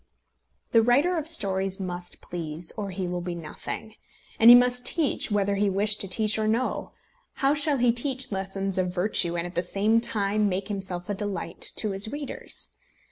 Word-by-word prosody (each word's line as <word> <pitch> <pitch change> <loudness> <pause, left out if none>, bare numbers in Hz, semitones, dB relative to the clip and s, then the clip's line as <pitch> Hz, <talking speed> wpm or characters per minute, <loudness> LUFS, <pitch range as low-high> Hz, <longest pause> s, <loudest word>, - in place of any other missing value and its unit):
The 230 - +5
writer 275 +10 +3
of 315 -2 -3
stories 195 - -1
must 180 -2 -5
please, 165 -1 -5
or 205 -2 -4
he 185 -1 -4
will 175 0 -3
be 175 0 -4
nothing. 170 +6 -7 0.5
And 225 - +8
he 240 - +12
must 250 0 +4
teach 295 0 +1
whether 200 -1 0
he 205 0 +2
wish 205 +2 +2
to 195 - -1
teach 215 +3 +1
or 215 - 0
no. 235 +4 -1 0.4
How 275 0 +1
shall 295 -1 +2
he 245 -1 +3
teach 260 +1 +1
lessons 195 0 -2
of 180 -1 0
virtue 180 -2 0
and 170 - -2
at 175 - -7
the 175 - 0
same 205 +5 +1
time 210 -2 +1
make 190 +2 -3
himself 190 -3 -4
a 205 - -2
delight 205 0 -5
to 215 - 0
his 195 +3 -4
readers? 290 -1 -4
205 Hz, 190 wpm, -26 LUFS, 185-235 Hz, 0.5 s, he